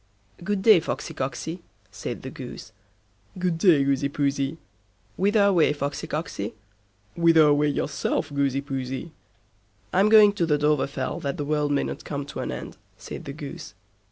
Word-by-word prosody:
"Good 195 0 -1
day, 215 -5 +8
Foxsy - - -4
Cocksy", 160 +6 -4 0.3
said - - -6
the - - -6
Goose. - - -9 0.7
"Good 180 -2 -1
day, 165 -7 +5
Goosey 140 0 +1
Poosey." 140 +1 -1 0.6
"Whither 205 +2 +3
away, 180 -7 +4
Foxy 140 -1 -4
Cocksy?" 115 - -4 0.6
"Whither 165 -2 +5
away 150 0 +4
yourself, 145 0 -1
Goosey 140 -1 +1
Poosey?" 135 +2 -5 0.8
"I'm 195 +3 +4
going 215 -2 +7
to 170 -5 0
the 150 -2 +3
Dovrefell 145 -2 0
that 140 -1 -3
the 145 - -3
world 150 0 0
mayn't 140 - -1
come 140 -2 -4
to 140 - -8
an - - -3
end", - - -7 0.2
said - - -8
the 140 - -6
Goose. 140 -7 -8
150 Hz, 155 wpm, -25 LUFS, 140-170 Hz, 0.8 s, day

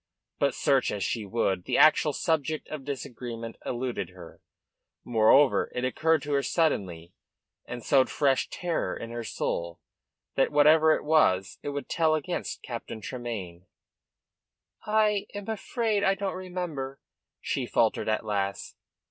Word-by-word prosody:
But, 140 - +1
search 135 -3 +2
as 100 -2 -3
she 110 -4 -2
would, 95 -4 0
the - - 0
actual 155 0 +6
subject 155 -1 -1
of 155 -3 -6
disagreement 120 -4 -6
eluded 125 0 -3
her. - - -13 0.6
Moreover, 120 +4 +4
it 125 0 -1
occurred 160 +4 +1
to 145 0 -3
her 140 - +3
suddenly, 95 - -1 0.5
and 120 -1 -6
sowed 135 -2 +4
fresh 135 -3 +1
terror 170 - -2
in 115 - -7
her 120 0 -4
soul, 85 -5 -3 0.5
that, 135 - +2
whatever 155 +2 +6
it - - -5
was, 150 -12 +2
it - - -4
would 145 0 -4
tell 160 -2 +2
against 175 +3 -4
Captain 115 -2 -6
Tremayne. 100 -8 -6 1.2
"I 210 -1 +2
I - - -3
am 205 - -7
afraid 220 -1 -1
I 195 0 +3
don't 195 0 -3
remember," 175 -8 -5 0.4
she - - -2
faltered - - +1
at 110 0 0
last. 100 -1 -3
140 Hz, 145 wpm, -27 LUFS, 115-160 Hz, 1.2 s, actual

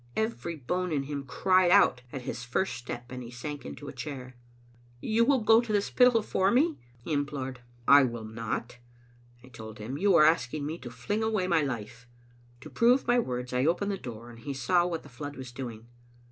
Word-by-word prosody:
Every 220 -6 -2
bone 180 +6 -2
in 145 -3 0
him 140 0 -5
cried 185 +7 +3
out 195 -9 +5
at 130 - -6
his 125 - -5
first 125 +8 -1
step, 120 +1 -7
and 125 0 -6
he 120 - -8
sank 140 +4 -7
into 70 - -9
a - - -7
chair. 130 -4 -7 0.3
" 120 - -28 0.2
You 220 - +2
will 265 0 +3
go 225 +2 +6
to 235 -2 -5
the 205 - +4
Spittal 240 +2 +3
for 190 -2 +1
me?" 295 +8 +2 0.2
he 120 +7 -5
implored. 135 -3 -3 0.3
"I 140 +1 +9
will 120 -4 -2
not," 115 +2 -5 0.6
I 130 - -14
told 110 -2 -10
him. 120 +7 -5
"You 200 -1 +4
are 155 -2 +7
asking 150 -2 +1
me 160 +3 -4
to 120 - -8
fling 125 - -3
away 220 -4 0
my 170 -3 +3
life. 125 -2 -5 0.3
" 120 0 -29
To - - -10
prove 245 +3 +4
my 240 +1 +4
words 125 - -3
I 125 +2 +2
opened 180 +5 +1
the - - -1
door, 120 0 -8
and 115 - -13
he 140 +4 -5
saw 175 +7 +2
what 165 -2 -4
the - - -13
flood 145 +3 -7
was 130 -2 -8
doing. 120 -3 -7
140 Hz, 215 wpm, -29 LUFS, 125-185 Hz, 0.6 s, I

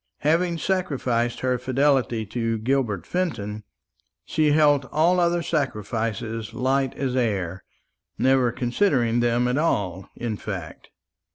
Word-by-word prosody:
Having 170 +3 +2
sacrificed 130 -11 -1
her 125 -1 0
fidelity 130 -3 +1
to 115 +2 -2
Gilbert 115 -4 -1
Fenton, 110 - -3 0.6
she 155 -2 +2
held 145 -2 +4
all 170 +4 +3
other 175 0 +2
sacrifices 115 - -2
light 130 +1 0
as 130 -2 -2
air 95 -7 -1 0.5
never 130 -2 +3
considered 120 - +1
them 120 +1 +2
at 125 +3 +1
all, 95 - -1
in 115 -3 -3
fact. 95 -7 -7
125 Hz, 115 wpm, -24 LUFS, 115-145 Hz, 0.6 s, held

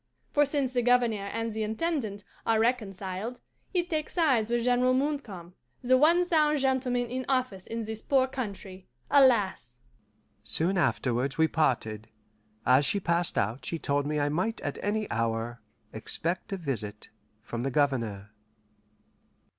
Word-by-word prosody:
For 290 -1 +3
since 275 -3 -1
the 245 - +2
Governor 235 -4 +2
and 230 0 -2
the 220 - -3
Intendant 220 -2 -2 0.2
are 225 -1 +2
reconciled, 215 -1 -2 0.3
he 360 -2 +1
takes 315 -3 -3
sides 265 -11 +3
with 240 0 +1
General 250 +1 +3
Montcalm, 245 - -3 0.3
the 255 +1 +4
one 335 +6 +5
sound 305 -3 +3
gentleman 260 -2 +1
in 255 +2 -4
office 255 -8 -1
in 230 0 -3
this 220 0 -6
poor 265 -2 +3
country 200 -7 -6 0.2
alas!" 220 - +3 0.7
Soon 160 - +1
afterwards 130 -4 0
we 160 0 +4
parted. 110 -9 0 0.6
As 130 +3 +5
she 200 - +1
passed 170 -1 0
out 110 +6 0
she 165 - -2
told 145 -1 0
me 150 0 0
I 145 0 +1
might 185 +10 -1
at - - -4
any 210 +1 -1
hour 115 +1 -2 0.3
expect 170 - -3
a 195 - -1
visit 110 - -4 0.3
from 115 +2 -5
the 135 - -1
Governor. 115 -8 0
210 Hz, 145 wpm, -28 LUFS, -, 0.7 s, one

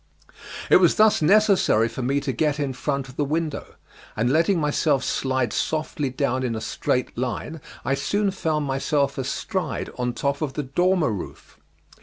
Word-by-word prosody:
It - - +9
was - - +4
thus 215 -4 +4
necessary 190 - +4
for 115 +3 -6
me 135 +3 +1
to 140 -1 -2
get 150 +3 0
in 140 -2 -1
front 140 0 -2
of 125 - -14
the 145 - +1
window, 155 +1 -3 0.4
and 115 +3 +1
letting 165 +3 +3
myself 150 -2 +1
slide 130 -1 -1
softly 155 -3 -1
down 130 0 -1
in 120 -3 -1
a - - -3
straight 125 +2 -2
line 130 +5 -4 0.2
I 130 - +1
soon 200 +9 0
found 155 -5 -1
myself 140 +1 0
astride 185 - -3
on 125 0 -1
top 140 +3 -2
of 145 -3 -2
the 150 - -3
dormer 175 +2 +1
roof. 100 -4 -8
140 Hz, 170 wpm, -24 LUFS, 130-160 Hz, 0.4 s, It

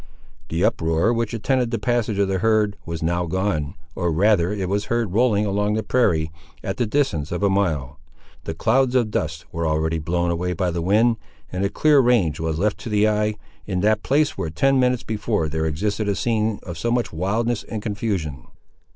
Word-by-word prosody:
The 85 +5 +1
uproar, 80 +7 +1
which 115 -2 -1
attended 125 +2 0
the 115 - -1
passage 120 -4 0
of 100 -1 +2
the 95 -1 0
herd, 110 -2 +2
was 85 -1 -4
now 85 +1 0
gone, 90 -5 -1 0.2
or 85 -1 -1
rather 90 +1 +3
it 100 -3 -2
was 100 +2 -1
heard 115 -5 -1
rolling 110 -2 +3
along 105 +1 0
the 110 - -1
prairie, 85 -9 +1 0.3
at 95 - -3
the 120 - 0
distance 105 - 0
of 90 +3 -2
a 100 - +3
mile. 80 -7 -1 0.5
The 80 - -4
clouds 125 +7 +2
of 120 -4 +2
dust 80 -1 -2
were 85 0 -2
already 80 +1 0
blown 85 +2 0
away 90 +1 -1
by 90 +1 -1
the 85 0 -2
wind, 110 +6 +3 0.3
and 90 +1 -2
a 100 - +1
clear 150 +5 +4
range 115 - +3
was 80 -1 -1
left 105 +4 0
to - - -7
the 105 0 +3
eye, 105 0 +1 0.3
in 90 -3 -1
that 105 +1 +2
place 145 +2 +1
where 80 - -3
ten 135 +12 +2
minutes 125 -1 +2
before 105 -5 -1
there 80 +1 -1
existed 105 +7 -1
a 100 - +1
scene 110 -2 0
of 85 -4 -7
so 115 - -1
much 120 -5 0
wildness 105 +7 0
and 110 -2 -6
confusion. 95 - -3
100 Hz, 205 wpm, -22 LUFS, 85-115 Hz, 0.5 s, clear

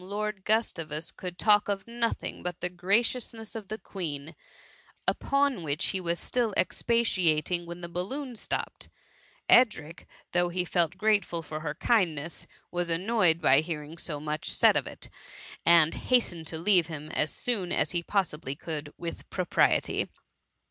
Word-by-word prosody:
Lord 205 0 -4
Gustavus 165 -8 0
could 180 -1 -7
talk 210 -1 +4
of 195 -1 -2
nothing 235 0 -2
but 180 0 -4
the 180 - -1
graciousness 225 +5 0
of 215 -3 -6
the 215 - -4
Queen, 160 -7 -6 0.7
upon 275 -6 +1
which 150 0 0
he 190 - -1
was 170 -1 -1
still 235 -5 -1
expatiating, 180 -7 +1
when 170 +1 -7
the 170 - -5
balloon 240 - -4
stopped; - - -4 0.6
Edric, 210 -10 +3 0.2
though 175 0 +2
he 180 +1 -1
felt 175 0 0
grateful 200 -5 +1
for 155 0 -6
her 155 -1 -4
kindness, 170 -8 0 0.2
was 175 -1 -1
annoyed 180 -1 +2
by 135 -4 +5
hearing 155 0 -5
so 150 -3 -3
much 155 +1 -3
said - - +5
of - - 0
it, - - -7 0.6
and 165 -2 +6
hastened 175 -10 +1
to 160 - -4
leave 175 -1 +4
him 155 -2 -7
as 155 - +1
soon 200 -8 -1
as - - +1
he 175 - 0
possibly 165 -7 -2
could 150 -1 -6
with 170 -1 -7
propriety. 180 -3 +2
175 Hz, 150 wpm, -28 LUFS, 160-210 Hz, 0.7 s, and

